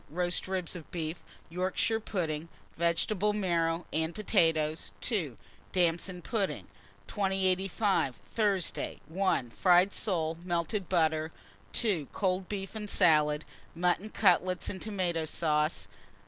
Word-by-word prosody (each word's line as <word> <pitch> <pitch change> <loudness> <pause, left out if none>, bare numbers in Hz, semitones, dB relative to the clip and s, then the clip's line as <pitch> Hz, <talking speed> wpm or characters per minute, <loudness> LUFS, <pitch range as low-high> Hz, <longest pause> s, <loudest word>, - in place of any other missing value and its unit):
Roast 175 +4 0
ribs 185 -3 -3
of 165 -4 -9
beef, 165 -1 -4 0.3
Yorkshire 185 +5 +1
pudding, 165 -7 -3 0.3
vegetable 180 +5 +1
marrow, 170 -4 0
and 160 +1 -1
potatoes. 165 -7 +1
2. 170 - -1 0.3
Damson 175 0 0
pudding. 195 -10 -1 0.4
2085. 190 - +1 0.2
Thursday. 200 -5 0
1. 165 -8 0
Fried 180 +5 +4
soles, 165 -6 0
melted 175 +2 -1
butter. 160 -3 +2 0.4
2. 185 - +1
Cold 185 -1 0
beef 195 -2 -4
and 210 -2 -5
salad; 150 -5 +4 0.3
mutton 180 +4 +1
cutlets 185 -3 +2
and 190 - -6
tomata 180 -6 -1
sauce. 150 -1 0
180 Hz, 110 wpm, -30 LUFS, 160-195 Hz, 0.4 s, Fried